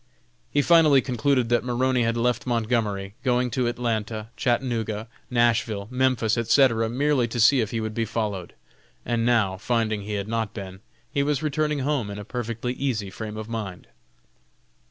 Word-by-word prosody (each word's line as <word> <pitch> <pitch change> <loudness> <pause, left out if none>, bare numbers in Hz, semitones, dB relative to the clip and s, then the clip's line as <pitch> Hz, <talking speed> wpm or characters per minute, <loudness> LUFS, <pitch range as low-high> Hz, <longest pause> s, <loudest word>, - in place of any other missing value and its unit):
He 145 - +2
finally 160 -4 +6
concluded 130 -1 +1
that 120 - +2
Maroney 125 +1 +1
had 115 0 +1
left 125 +2 0
Montgomery, 110 -4 -1
going 125 -1 +1
to 125 -1 0
Atlanta, 110 -2 -2
Chattanooga, 115 -4 -1 0.2
Nashville, 115 -4 +1
Memphis, 125 -3 +1
etc., 115 -1 +3
merely 135 0 +1
to 120 +1 -4
see 125 +3 +6
if 110 - -2
he 115 - -2
would 110 0 -3
be 115 +1 -1
followed, 105 -5 -3 0.5
and 115 -1 0
now, 105 -6 +2
finding 110 0 0
he 105 +1 -5
had 100 0 -2
not 110 -2 -2
been, 95 -2 -7 0.3
he 140 - +1
was 145 0 0
returning 150 -1 0
home 135 -6 -1
in 100 - -6
a 105 - -7
perfectly 120 +1 -3
easy 115 -8 -2
frame 110 +1 -6
of 110 0 -6
mind. 105 -6 -5
115 Hz, 165 wpm, -25 LUFS, 110-125 Hz, 0.5 s, finally